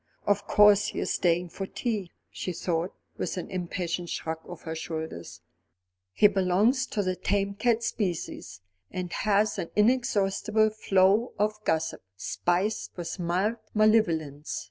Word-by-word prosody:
"Of 205 0 +1
course 210 -1 +6
he - - -4
is - - -1
staying 175 0 +1
for 195 +3 -5
tea," 210 -7 -3 0.2
she 180 - -4
thought, 170 +1 -2 0.2
with - - -2
an 180 - -5
impatient 175 -1 -3
shrug 160 0 -3
of 175 -2 -9
her 160 - -4
shoulders. 160 - -6 0.7
"He 150 - +3
belongs 205 +7 +2
to 205 - -1
the 185 -1 -1
tame 200 +1 0
cat 230 +2 +1
species, 170 - -3 0.3
and 180 -2 -5
has 210 0 +1
an 170 - -3
inexhaustible 215 -2 +2
flow 200 +2 +3
of 215 +1 -1
gossip, 160 0 0 0.2
spiced 185 - -1
with 175 +2 -5
mild 185 +6 0 0.2
malevolence. 165 -10 +2
190 Hz, 140 wpm, -27 LUFS, 170-215 Hz, 0.7 s, course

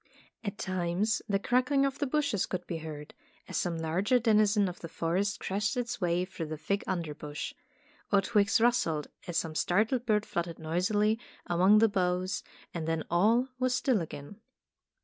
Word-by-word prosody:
At 200 -2 -4
times 185 +4 0
the 200 - +3
crackling 255 +6 +2
of 275 0 -2
the 285 - 0
bushes 255 -8 0
could 180 -1 -4
be 165 - -4
heard, 150 -2 -8 0.3
as - - -7
some 170 -2 0
larger 175 +9 +1
denizen 215 -3 +3
of 180 - -6
the 165 - -7
forest 185 +5 -1
crashed 205 +4 -1
its 245 -2 -3
way 175 0 +1
through 175 -4 -6
the 155 0 -5
thick 200 +6 -1
underbrush; 150 -4 -4 0.6
or 200 - +6
twigs 210 +2 +3
rustled 225 -11 +2 0.2
as 175 -2 -2
some 160 - -1
startled 220 +10 +1
bird 210 -1 +2
fluttered 170 -1 -3
noisily 205 +7 +1 0.3
among 185 +4 +5
the 225 +1 +6
boughs, 185 -1 0 0.3
and 160 -2 -4
then 165 -1 0
all 225 +9 +3
was 255 0 +2
still 260 - +2
again. 160 +5 -8
195 Hz, 170 wpm, -30 LUFS, 170-220 Hz, 0.6 s, or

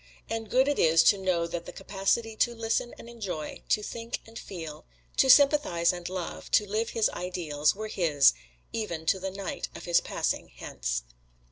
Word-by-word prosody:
And 225 -1 -3
good 260 +4 +3
it 290 - +1
is 165 0 +5
to 200 - +5
know 180 -3 +1
that 170 0 -5
the - - -6
capacity 200 +4 -1
to 240 +1 +2
listen 225 +1 -1
and - - -11
enjoy, 200 -10 -6
to 210 - +2
think 230 +2 -5
and 225 0 -9
feel, 160 -5 -8 0.3
to 265 - +4
sympathize 275 - +5
and 175 0 -6
love 185 -2 -5
to 210 - +5
live 220 +3 -1
his 225 -2 +2
Ideals 165 -5 -1
were 215 +2 -5
his, 160 -9 +4 0.4
even 170 -8 -3
to 190 +4 +2
the 190 +1 -3
night 195 0 -5
of - - -8
his 175 -1 +3
passing - - -2
Hence. - - -3
195 Hz, 180 wpm, -28 LUFS, 170-225 Hz, 0.4 s, is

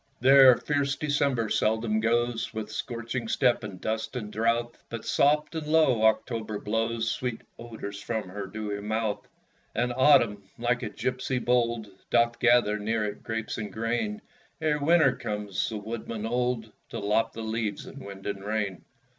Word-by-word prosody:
There 130 -1 +8
fierce 140 -1 0
December 140 -6 0
seldom 110 0 +1
goes, 115 0 0
With 110 -1 -4
scorching 115 +1 -4
step 120 +1 +2
and 100 -4 -7
dust 110 +5 -3
and 105 -4 -5
drouth; 115 +1 0
But, 115 -2 -6
soft 150 +3 +2
and 160 -2 -4
low, 155 -7 +4
October 110 -1 +1
blows 115 +2 -1
Sweet 125 -3 -3 0.2
odours 105 -4 -7
from 110 -2 -3
her 100 +2 -5
dewy 105 -2 -4
mouth. 110 0 -2 0.5
And 120 +2 0
Autumn, 120 -6 +4
like 120 +1 0
a 110 - -3
gipsy 130 +3 -2
bold, 120 -2 +1 0.2
Doth 120 0 +2
gather 120 -3 +4
near 110 +1 0
it 105 0 -5
grapes 110 0 -4
and 105 -2 -5
grain, 120 - -2 0.4
Ere 155 -2 +1
Winter 155 -2 +4
comes, 105 -2 -3
the 110 - -4
woodman 110 +1 -5
old, 120 -1 -1 0.2
To - - -5
lop 105 +2 +1
the 115 - -6
leaves 110 -2 -2
in - - -10
wind 100 -1 -10
and 100 -1 -4
rain. 105 -3 -2
115 Hz, 160 wpm, -27 LUFS, 110-125 Hz, 0.5 s, There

